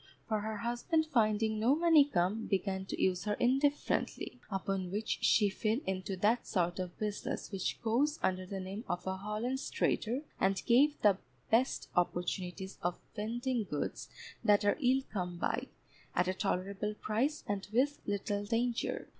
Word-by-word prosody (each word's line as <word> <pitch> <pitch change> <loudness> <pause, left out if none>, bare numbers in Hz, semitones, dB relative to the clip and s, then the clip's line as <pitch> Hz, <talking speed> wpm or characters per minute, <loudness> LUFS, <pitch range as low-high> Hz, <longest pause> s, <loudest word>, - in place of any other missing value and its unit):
For 215 -1 +1
her 215 +1 -3
husband 240 - 0
finding 220 -5 +2
no 245 +6 +4
money 325 -3 +6
come, 205 -3 0
began 190 -1 -1
to - - -4
use 185 +1 +1
her 210 -1 +1
indifferently, 270 0 +1
upon 195 -2 -2
which 210 +4 -2
she 210 - +5
fell 215 +3 0
into 190 0 -2
that 215 +6 +2
sort 175 -1 0
of 180 -1 -4
business 210 -1 -3
which 195 -2 -2
goes 275 +7 +2
under 185 0 0
the 195 0 -4
name 190 +4 -5
of 175 0 -2
a 190 0 -2
Holland's 215 +7 -3
Trader, 240 +5 0 0.2
and 190 0 +2
gave 280 +5 +4
the 200 -2 +5 0.3
best 245 +4 +2
opportunities 180 +2 -1
of 175 0 -1 0.2
vending 240 +3 -1
goods 150 -5 -4 0.3
that 205 0 +4
are 205 - +3
ill 260 +1 +4
come 180 -3 -2
by, - - -1 0.5
at 180 +1 +2
a 185 - +1
tolerable 200 +3 -2
price, 245 +9 -1
and 205 -1 -2
with 275 +6 +2
little 205 0 -1
danger. 235 +3 -1
210 Hz, 160 wpm, -33 LUFS, 190-240 Hz, 0.5 s, money